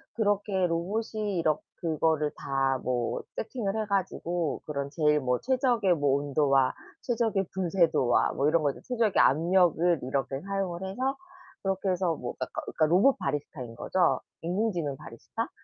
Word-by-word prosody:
그렇게 205 -3 +1
로봇이 205 +3 -2
이렇 155 -2 +2 0.2
그거를 160 -2 +1
다 135 -1 0
뭐 120 -2 -1
세팅을 220 -3 -3
해 - - -2
가지고 175 -4 -1
그런 140 -2 -3
제일 150 -1 +3
뭐 125 -2 0
최적의 245 -8 +2
뭐 145 -2 +2
온도와 140 -2 +2 0.3
최적의 225 -5 0
분쇄도와 170 -9 +2
뭐 140 - +1
이런 160 +1 +3
것들 140 -2 -1
최적의 230 -5 +2
압력을 170 +2 +3
이렇게 135 +1 -2
사용을 195 -2 -3
해서 260 +8 -2 0.5
그렇게 195 0 -1
해서 180 -2 +1
뭐 120 -4 -5
어 - - -14 0.3
그니까 155 - +1
로봇 190 - +4
바리스타인 135 -4 -4
거죠. 180 +7 +1 0.2
인공지능 175 -5 -1
바리스타. - - -6
170 Hz, 325 characters per minute, -28 LUFS, 145-195 Hz, 0.5 s, 로봇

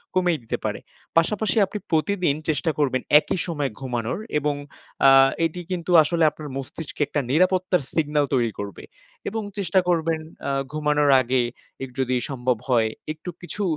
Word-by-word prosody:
কমিয়ে 180 -4 +2
দিতে 115 - -3
পারে। - - -2 0.4
পাশাপাশি 210 +7 +2
আপনি 205 +2 -6
প্রতিদিন 170 -1 +1
চেষ্টা 155 +2 +1
করবেন 130 -3 +1 0.2
একই 175 - -3
সময় 145 -5 -1
ঘুমানোর। 125 - -3 0.2
এবং 145 0 0 0.5
আ - - +9 0.4
এটি 170 +2 -3
কিন্তু 180 -1 -2
আসলে 165 +2 +1
আপনার 150 0 -9
মস্তিষ্কে 140 +3 -7
একটা 145 0 -1
নিরাপত্তার 185 +2 +2
সিগনাল 150 -2 +1
তৈরি 120 -4 +2
করবে। 100 -1 -6 0.5
এবং 225 +2 -3 0.2
চেষ্টা 190 -1 +2
করবেন 165 -2 +1 0.3
আ - - 0 0.2
ঘুমানোর 150 -1 +2
আগে 130 +1 +1 0.4
এগ 135 - -5
যদি 130 -1 +1
সম্ভব 125 -2 0
হয় 115 -3 +3 0.2
একটু 155 +3 -9
কিছু 205 +4 -4
155 Hz, 155 wpm, -24 LUFS, 135-175 Hz, 0.5 s, আ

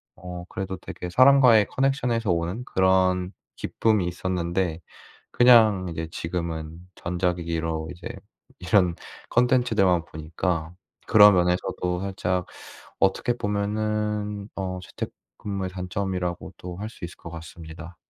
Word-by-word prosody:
어 90 -1 -8
그래도 95 -1 -4
되게 90 - -7
사람과의 125 -1 +6
connection에서 125 -6 +1
오는 85 +7 -1
그런 95 -1 +2 0.2
기쁨이 105 -5 +1
있었는데 90 -1 -2 0.5
그냥 110 -7 +6
이제 80 -1 -4
지금은 80 -1 -4 0.2
전자기기로 85 -2 -2
이제 85 - -8 0.5
이런 90 -2 +3 0.3
콘텐츠들만 115 -8 +3
보니까 80 +1 -3 0.3
그런 105 -1 +8
면에서도 90 0 0
살짝 90 -2 -1 0.6
어떻게 100 +6 +2
보면은 105 0 -2
어 95 -1 -3
재택근무의 95 +1 -6
단점이라고도 90 -1 -4
할 105 +2 -4
수 105 - -10
있을 85 - -8
것 85 - -10
같습니다. 85 +1 -10
90 Hz, 305 characters per minute, -25 LUFS, 85-105 Hz, 0.6 s, 그런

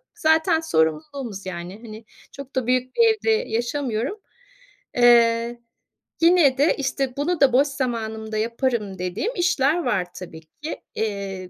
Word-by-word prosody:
Zaten 320 -3 +3
sorumluluğumuz, 200 - -1
yani, 180 +2 -7
hani, 220 0 -10 0.3
çok 275 -1 -11
da 255 -3 -1
büyük 255 0 0
bir - - +3
evde 445 +1 0
yaşamıyorum. 250 - -1 0.8
Eee, 235 -1 +4 0.6
yine 330 -6 +5
de, 295 +3 +4
işte, 270 -1 -2
"Bunu 325 +4 -1
da 270 -3 +5
boş 275 +3 +4
zamanımda 220 -5 -3
yaparım" 230 -3 -2
dediğim 185 - -3
işler 345 -2 +1
var 185 -3 0
tabii 165 -3 -9
ki. 285 - -8
Eee, 195 -4 -4
240 Hz, 130 wpm, -23 LUFS, 215-285 Hz, 0.8 s, yine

